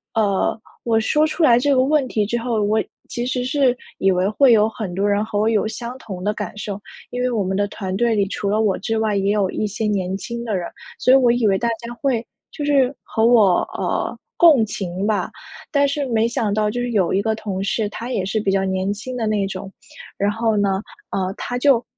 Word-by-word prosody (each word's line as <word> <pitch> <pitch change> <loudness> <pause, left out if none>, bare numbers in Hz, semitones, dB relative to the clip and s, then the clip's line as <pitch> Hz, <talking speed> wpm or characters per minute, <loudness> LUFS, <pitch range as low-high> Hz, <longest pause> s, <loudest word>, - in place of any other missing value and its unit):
呃， 205 -1 +1 0.3
我 230 -2 +2
说 300 +7 +2
出 320 +1 -1
来 240 -4 +6
这 280 +2 +2
个 255 - +4
问 285 -1 +2
题 210 -2 0
之 235 +3 -1
后， 230 -3 -1
我 215 +1 +2 0.3
其 240 0 -3
实 250 -1 -1
是 260 -1 +2 0.2
以 195 0 +3
为 180 +2 +1
会 250 +2 +5
有 215 0 +5
很 205 -5 -5
多 200 +2 +1
人 205 +1 +2
和 205 - -4
我 215 +2 +2
有 215 -1 +1
相 235 +2 -6
同 185 -7 -8
的 210 +1 0
感 205 -2 -6
受， 205 -1 -5 0.3
因 245 0 -4
为 250 - +1
我 220 -5 0
们 190 +1 -2
的 205 0 +1
团 190 -2 -5
队 235 -1 +2
里 200 -1 +2
除 200 -1 -2
了 215 +2 +2
我 200 -4 +1
之 225 +3 -1
外， 220 -1 +1
也 195 +1 +1
有 200 -3 +1
一 215 - -1
些 215 +2 -3
年 190 -2 -1
轻 235 +4 -5
的 215 -4 -1
人， 175 -2 -3 0.3
所 255 - +4
以 - - +8
我 250 -3 +4
以 240 -2 +1
为 190 - +3
大 235 - -1
家 235 0 -7
会 245 -5 0 0.2
就 295 - -6
是 275 -2 +3
和 225 0 0
我， 215 -7 +5 0.2
呃， - - -2 0.2
共 295 -10 +6
情 190 -2 -4
吧。 215 - 0 0.4
但 285 -1 +3
是 280 0 -1
没 225 -1 +2
想 220 -3 -1
到 210 0 +1
就 245 +3 -3
是 245 -1 -2
有 195 -5 +1
一 195 - +2
个 220 +1 0
同 195 -3 -4
事， 210 +1 0
他 235 +4 -6
也 190 -6 -1
是 215 +3 -1
比 195 - +1
较 195 0 +1
年 190 +1 -1
轻 250 +5 -7
的 225 - -1
那 210 -2 +1
种， 195 0 -7 0.5
然 200 +1 +1
后 225 -1 0
呢， 195 -1 +1 0.3
呃， 190 0 -1
他 245 - -3
就 250 -3 +4
220 Hz, 260 characters per minute, -21 LUFS, 200-245 Hz, 0.5 s, 以